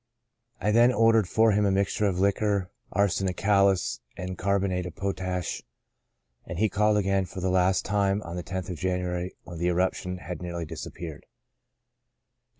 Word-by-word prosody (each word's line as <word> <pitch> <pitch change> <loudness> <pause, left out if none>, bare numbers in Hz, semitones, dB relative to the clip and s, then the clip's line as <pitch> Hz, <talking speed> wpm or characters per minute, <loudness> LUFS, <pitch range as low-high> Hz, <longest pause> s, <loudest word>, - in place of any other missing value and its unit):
I 105 - +1
then 120 +3 +6
ordered 115 -4 +4
for 115 0 +4
him 105 +1 +2
a 100 - +3
mixture 100 +2 +1
of 95 -3 -1
liquor 100 -1 +1 0.2
arsenicalis 95 -5 +2 0.2
and 95 0 -4
carbonate 95 -1 0
of 85 - -9
potash, 95 -2 -3 0.8
and - - -7
he 110 0 +2
called 105 +2 +2
again 95 -1 +1
for 90 - -8
the 95 0 0
last 95 +1 +2
time 100 -1 +1
on 85 +1 -7
the 90 - -3
lOth 95 0 -3
of 85 - -6
January, 90 -1 -2
when 85 -2 -9
the 85 - 0
eruption 90 +1 0
had 90 0 -7
nearly 85 -1 -4
dis - - -7
appeared. 80 -3 -8
95 Hz, 160 wpm, -27 LUFS, 90-100 Hz, 0.8 s, then